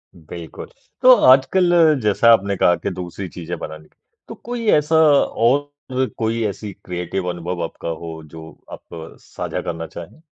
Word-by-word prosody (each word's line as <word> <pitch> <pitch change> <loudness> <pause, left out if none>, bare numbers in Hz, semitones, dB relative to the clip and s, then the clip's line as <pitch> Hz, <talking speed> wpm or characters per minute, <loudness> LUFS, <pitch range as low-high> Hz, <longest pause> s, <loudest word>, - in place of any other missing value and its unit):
बिल्कुल। 80 -1 -10 0.3
तो 255 0 +8 0.2
आजकल 175 +8 +3 0.3
जैसा 105 +3 +4
आपने 100 -2 +1
कहा 90 - +4
कि - - -4
दूसरी 90 +1 -6
चीज़ें 85 0 -7
बनानी। 80 -1 -9 0.4
तो - - -8
कोई 240 0 -6
ऐसा 150 +2 0
और 145 -2 +2
कोई 115 0 -1
ऐसी 105 +1 -6
क्रिएटिव 90 +1 -4
अनुभव 85 0 -4
आपका 85 - -6
हो 80 -1 -7
जो 80 0 -10 0.2
आप 80 -1 -10
साझा - - -6
करना 80 -1 -5
चाहें? 85 - -11
95 Hz, 145 wpm, -20 LUFS, 85-130 Hz, 0.4 s, तो